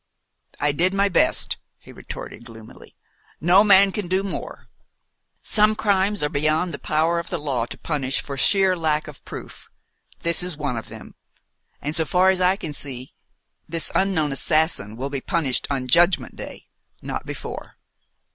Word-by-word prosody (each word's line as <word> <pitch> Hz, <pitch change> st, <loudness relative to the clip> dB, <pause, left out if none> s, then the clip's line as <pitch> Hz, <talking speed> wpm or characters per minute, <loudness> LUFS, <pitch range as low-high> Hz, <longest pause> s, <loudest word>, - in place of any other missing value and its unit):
"I 145 Hz, 0 st, +2 dB
did 180 Hz, +6 st, +1 dB
my 200 Hz, 0 st, +3 dB
best," 180 Hz, -, +2 dB, 0.2 s
he -, -, -15 dB
retorted 120 Hz, -, -9 dB
gloomily. 115 Hz, -2 st, -14 dB, 0.4 s
"No 180 Hz, +5 st, +6 dB
man 200 Hz, -1 st, +6 dB
can 205 Hz, -2 st, -3 dB
do 190 Hz, +2 st, +1 dB
more. 200 Hz, -, -6 dB, 0.8 s
Some 215 Hz, 0 st, +4 dB
crimes 205 Hz, -3 st, +1 dB
are -, -, +3 dB
beyond 155 Hz, +4 st, +1 dB
the 140 Hz, -, -6 dB
power 160 Hz, +3 st, +1 dB
of 170 Hz, -, -6 dB
the 175 Hz, -, -2 dB
law 135 Hz, -6 st, -2 dB
to -, -, -8 dB
punish 135 Hz, -4 st, -1 dB
for 140 Hz, -, -6 dB
sheer 190 Hz, +7 st, +3 dB
lack 155 Hz, -2 st, 0 dB
of 150 Hz, -, -11 dB
proof. -, -, -9 dB, 0.5 s
This 170 Hz, 0 st, +1 dB
is 180 Hz, -4 st, -3 dB
one 140 Hz, -5 st, -2 dB
of 115 Hz, -1 st, -5 dB
them; 110 Hz, 0 st, -11 dB, 0.7 s
and, 150 Hz, +2 st, -2 dB
so 160 Hz, -1 st, +2 dB
far 185 Hz, +3 st, +4 dB
as 185 Hz, -1 st, -2 dB
I 180 Hz, +1 st, +4 dB
can 160 Hz, -7 st, -6 dB
see, 130 Hz, -3 st, -5 dB, 0.6 s
this 165 Hz, -2 st, -2 dB
unknown 180 Hz, -7 st, +1 dB
assassin 155 Hz, -, 0 dB
will 135 Hz, +4 st, -4 dB
be 140 Hz, -2 st, -3 dB
punished 140 Hz, -5 st, 0 dB
on 135 Hz, -2 st, -1 dB
Judgment 170 Hz, +6 st, +3 dB
Day -, -, -8 dB, 0.4 s
not -, -, -5 dB
before." -, -, -7 dB
160 Hz, 165 wpm, -23 LUFS, 140-185 Hz, 0.8 s, No